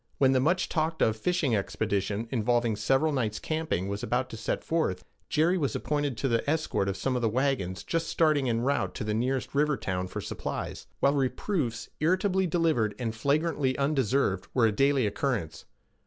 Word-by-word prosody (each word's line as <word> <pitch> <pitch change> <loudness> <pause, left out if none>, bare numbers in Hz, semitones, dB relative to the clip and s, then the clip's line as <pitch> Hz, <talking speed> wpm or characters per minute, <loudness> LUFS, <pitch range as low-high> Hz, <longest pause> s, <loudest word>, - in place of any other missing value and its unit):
When 135 -1 +4
a - - +4
much 170 +8 +2
talked 160 0 0
of 110 - +2
fishing 150 0 +1
expedition, 100 +1 -1
involving 120 -1 +1
several 135 +9 +2
nights' 110 -6 -1
camping, 155 - -2
was 100 +1 -3
about 130 +1 -1
to - - -6
set 110 - -3
forth, 160 - -1 0.2
Jerry 170 +4 +2
was 140 -4 -1
appointed 145 -4 -1
to 135 - 0
the 115 +2 0
escort 155 -10 0
of 95 - -3
some 135 - -1 0.2
wagons 120 -8 0
just 165 0 -1
starting 150 -5 +2
en 115 0 +1
route 140 +3 0
to 125 - -3
the 105 0 -1
nearest 125 +4 -1
river 150 0 +2
town 90 -1 -2
for - - -5
supplies; - - -5
while 140 - +4
reproofs, 135 - -1
irritably 185 +3 +2
delivered 155 - +1
and 115 -3 -2
flagrantly 140 +2 0
undeserved, 135 -8 +1
were 120 -3 +4
a 110 - +3
daily 135 +3 +2
occurrence. 100 - -2
130 Hz, 175 wpm, -28 LUFS, 110-150 Hz, 0.2 s, When